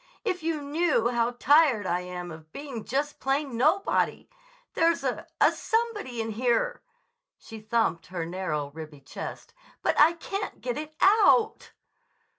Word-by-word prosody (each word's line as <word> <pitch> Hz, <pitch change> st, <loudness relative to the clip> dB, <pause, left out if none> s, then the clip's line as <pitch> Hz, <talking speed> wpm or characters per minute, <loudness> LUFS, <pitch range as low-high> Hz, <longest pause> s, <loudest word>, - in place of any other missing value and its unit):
If 365 Hz, -5 st, -1 dB
you 320 Hz, -2 st, -2 dB
knew 290 Hz, -5 st, +1 dB
how 235 Hz, 0 st, 0 dB
tired 280 Hz, -6 st, +4 dB
I 175 Hz, -1 st, 0 dB
am 180 Hz, -1 st, -6 dB
of 155 Hz, 0 st, -12 dB
being 270 Hz, -, -7 dB
just 290 Hz, +3 st, -2 dB
plain 270 Hz, -1 st, -1 dB
nobody! 310 Hz, +11 st, +1 dB, 0.5 s
There's 335 Hz, 0 st, +2 dB
a—a -, -, +1 dB
somebody 445 Hz, -, -2 dB
inside 225 Hz, -1 st, -3 dB
here"—she 485 Hz, -, -4 dB
thumped 220 Hz, -6 st, 0 dB
her 175 Hz, -2 st, -4 dB
narrow, 165 Hz, -5 st, -3 dB
ribby 155 Hz, -2 st, -10 dB
chest—"but -, -, -5 dB
I 315 Hz, +3 st, +7 dB
can't 395 Hz, +4 st, -5 dB
get 245 Hz, -1 st, -3 dB
it 310 Hz, 0 st, -8 dB
out." 435 Hz, +2 st, +4 dB
270 Hz, 130 wpm, -27 LUFS, 205-335 Hz, 0.5 s, I